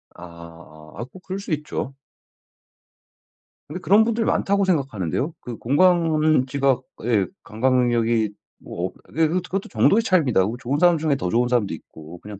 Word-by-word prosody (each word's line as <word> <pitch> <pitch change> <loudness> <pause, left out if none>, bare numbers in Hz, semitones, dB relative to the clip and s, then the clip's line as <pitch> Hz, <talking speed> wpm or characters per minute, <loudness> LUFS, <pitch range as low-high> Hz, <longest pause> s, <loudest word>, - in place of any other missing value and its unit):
아아 85 -1 -13
아 - - -4
뭐 185 - -13
그럴 190 +1 -5
수 195 - -8
있죠. 150 -2 -4 1.8
근데 175 +5 -5
그런 205 +4 +5
분들 230 0 0
많다고 200 0 +1
생각하는데요. 135 - -1
그 120 -2 -7
공간 155 -1 +3
지각 135 -2 +1 0.2
예. 105 -6 +1 0.2
감각 130 +4 0
능력이 115 -3 +1 0.3
뭐 90 +2 -4
어 - - -11
그게 160 +1 +1
그것도 180 +3 -1
그것도 190 +2 -4
정도의 225 +3 +3
차이입니다. 150 - +2
뭐 110 +5 -3
좋은 135 +4 -2
사람 175 -2 +5
중에 155 -2 +1
더 90 -9 -3
좋은 120 +3 +2
사람도 120 -5 0
있고 80 +2 -13
그냥 105 -1 -10
130 Hz, 340 characters per minute, -22 LUFS, 105-170 Hz, 1.8 s, 그런